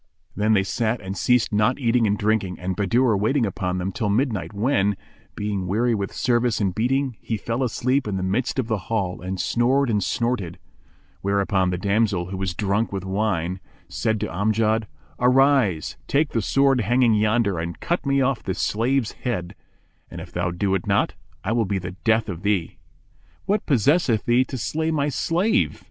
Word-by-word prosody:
Then 105 +2 +2
they 100 -2 +3
sat 115 +4 -1
and 95 0 -6
ceased 125 -2 +2
not 105 +5 +2
eating 120 -3 +2
and 105 0 +1
drinking 105 -3 0
(and 90 +1 -3
Bahadur 115 +4 +2
waiting 115 +6 +1
upon 90 -2 -2
them) 90 +1 -2
till 105 +2 -2
midnight 105 - 0
when, 100 -3 +1 0.4
being 100 -3 -3
weary 115 +6 +1
with 100 -3 -2
service 120 -1 +1
and 100 -4 0
beating, 130 +3 0
he 110 - -3
fell 115 +5 -3
asleep 130 +1 0
in 100 -2 -2
the 95 - -2
midst 105 +10 -1
of 130 - 0
the 110 -3 -1
hall 100 -5 -1
and 95 +1 -4
snored 125 +7 +2
and 105 -3 +1
snorted; 110 -8 -1 0.6
whereupon 100 -1 +1
the 90 - -1
damsel, 100 -2 0
who 95 - -4
was 95 -2 -3
drunken 100 +2 0
with 95 -1 -4
wine, 95 -3 -1 0.3
said 110 +4 -1
to - - 0
Amjad, 110 +4 0 0.3
"Arise, 125 - +3
take 145 +1 +2
the 115 - 0
sword 135 +4 +3
hanging 120 +2 +3
yonder 105 -3 +2
and 85 +1 -5
cut 175 - -1
me 140 -1 +2
off 130 -2 +1
this 95 - -4
slave's 120 +2 0
head; 95 -7 -4 0.6
and, - - -8
if - - -9
thou 85 0 -1
do 95 +3 -1
it 95 +3 -1
not, 100 -1 +2 0.3
I 100 - -1
will 115 -1 +2
be 100 0 -1
the 90 -1 -5
death 110 +4 +1
of 90 -4 -5
thee!" 100 -4 -1 0.7
"What 200 +1 0
possesseth 135 - +2
thee 120 +2 +3
to 130 - -6
slay 160 +6 -1
my 150 -2 0
slave?" 175 +9 +1
110 Hz, 185 wpm, -23 LUFS, 95-125 Hz, 0.7 s, they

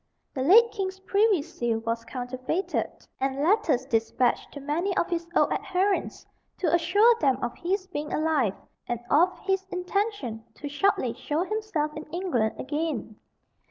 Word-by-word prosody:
The 260 - -3
late 450 - +6
king's 380 -3 -3
privy 400 -3 +2
seal 240 -8 -2
was 230 0 -2
counterfeited, 255 +9 -2 0.3
and 270 +1 -1
letters 330 - +2
despatched 235 0 0
to 285 - -8
many 330 +7 -1
of - - +1
his 340 -1 -1
old - - +4
adherents 380 +2 -1 0.3
to 340 -4 0
assure 385 +8 +5
them 270 -4 +3
of 240 - -1
his 375 +2 -1
being 300 -5 -5
alive, 300 -10 +1 0.3
and 240 -1 -2
of 355 +5 +4
his 385 -1 +1
intention 360 - -2
to 290 - -7
shortly 290 - +1
show 305 +3 -2
himself 385 -8 -2
in 305 - -6
England 305 - -1
again. 290 -6 -3
320 Hz, 150 wpm, -27 LUFS, 260-380 Hz, 0.3 s, late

